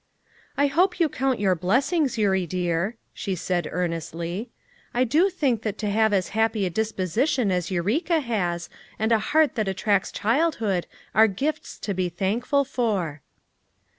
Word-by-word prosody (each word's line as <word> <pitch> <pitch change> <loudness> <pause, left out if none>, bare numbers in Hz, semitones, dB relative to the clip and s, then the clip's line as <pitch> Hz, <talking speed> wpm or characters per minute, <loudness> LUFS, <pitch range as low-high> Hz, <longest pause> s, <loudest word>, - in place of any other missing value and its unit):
"I 285 - +4
hope 350 +8 +2
you 335 - +4
count 265 -2 -1
your 195 -2 +3
blessings, 255 - +1
Eurie 190 -4 +2
dear," 175 +4 -1 0.2
she 195 -2 -3
said 175 -1 -1
earnestly. 170 +4 -3 0.5
"I 250 - +4
do 310 - +3
think 270 - 0
that 215 -2 -3
to 210 -2 -2
have 220 +1 +3
as 190 -3 +1
happy 220 -1 +1
a 180 - -2
disposition 220 - 0
as 180 -2 -1
Eureka 225 - +1
has, 180 - -2 0.3
and 220 +2 0
a 225 - +5
heart 305 +6 +2
that 215 -5 -1
attracts 195 +1 +1
childhood 225 - 0 0.3
are 220 +2 +6
gifts 270 +10 -3
to 200 - -2
be 185 -1 -1
thankful 230 - 0
for." 200 - -1
215 Hz, 155 wpm, -25 LUFS, 185-260 Hz, 0.5 s, are